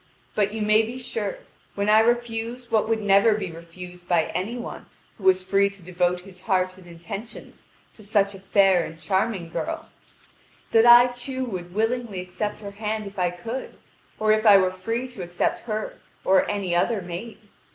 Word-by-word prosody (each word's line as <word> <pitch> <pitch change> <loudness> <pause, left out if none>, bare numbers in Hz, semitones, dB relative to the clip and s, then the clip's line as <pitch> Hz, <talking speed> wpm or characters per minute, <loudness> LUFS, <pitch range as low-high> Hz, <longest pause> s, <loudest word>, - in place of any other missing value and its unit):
But, 205 -1 +1
you 220 0 -3
may 215 +1 +5
be 230 +3 -5
sure, 225 -5 -4 0.4
when 200 0 -1
I 215 +1 +6
refuse 235 +1 -1
what 220 0 +2
would 220 -1 0
never 205 +2 +5
be 200 -5 -4
refused 175 +2 -11
by 170 -3 +2
any 205 +7 -2
one 240 - -7 0.3
who 190 - -9
was 185 0 +5
free 195 +1 +3
to 200 -2 -14
devote 180 0 0
his 185 -1 -14
heart 185 -2 0
and 185 -1 -16
intentions 175 +7 -9 0.3
to 215 - -14
such 200 -1 +1
a 195 - -10
fair 195 -2 +3
and 165 0 -8
charming 190 0 -1
girl, - - -4 0.8
that 225 +1 +5
I 240 +1 +8
too 260 +1 -4
would 180 -5 -6
willingly 225 -2 -1
accept 185 +4 -4
her 200 -1 -7
hand 215 +1 -3
if 200 -1 -8
I 180 -1 +2
could, 225 +9 -6 0.4
or 215 0 +2
if 215 0 +3
I 205 -3 +8
were 185 -1 +2
free 225 +7 -3
to 245 -6 -9
accept 175 +6 -2
her 215 -1 -4 0.3
or 190 0 +4
any 200 -4 -2
other 195 +3 +1
maid. 180 +6 -7
200 Hz, 185 wpm, -24 LUFS, 185-225 Hz, 0.8 s, I